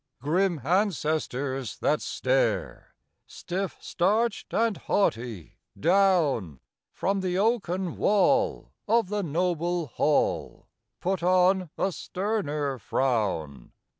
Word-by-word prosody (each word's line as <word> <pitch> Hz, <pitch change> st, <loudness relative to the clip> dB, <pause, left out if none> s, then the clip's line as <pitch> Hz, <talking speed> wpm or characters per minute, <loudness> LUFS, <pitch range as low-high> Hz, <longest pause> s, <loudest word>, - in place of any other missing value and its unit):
Grim 175 Hz, +3 st, +1 dB
ancestors 150 Hz, -, -1 dB
that 150 Hz, -, +1 dB
stare, -, -, -1 dB, 0.3 s
Stiff, 185 Hz, +2 st, -4 dB
starched 210 Hz, +5 st, 0 dB
and 225 Hz, -1 st, +1 dB
haughty, 115 Hz, -, -2 dB, 0.2 s
down 160 Hz, -, +2 dB, 0.3 s
From 195 Hz, 0 st, -1 dB
the 180 Hz, -1 st, -1 dB
oaken 190 Hz, -5 st, 0 dB
wall 210 Hz, +7 st, +2 dB, 0.2 s
of 225 Hz, -2 st, +2 dB
the 210 Hz, 0 st, -1 dB
noble 175 Hz, 0 st, -1 dB
hall, 145 Hz, +3 st, 0 dB, 0.4 s
Put 190 Hz, 0 st, -1 dB
on 185 Hz, 0 st, +3 dB
a 195 Hz, -, 0 dB
sterner 150 Hz, -, -2 dB
frown. 100 Hz, -, -1 dB
180 Hz, 95 wpm, -27 LUFS, 145-195 Hz, 0.4 s, on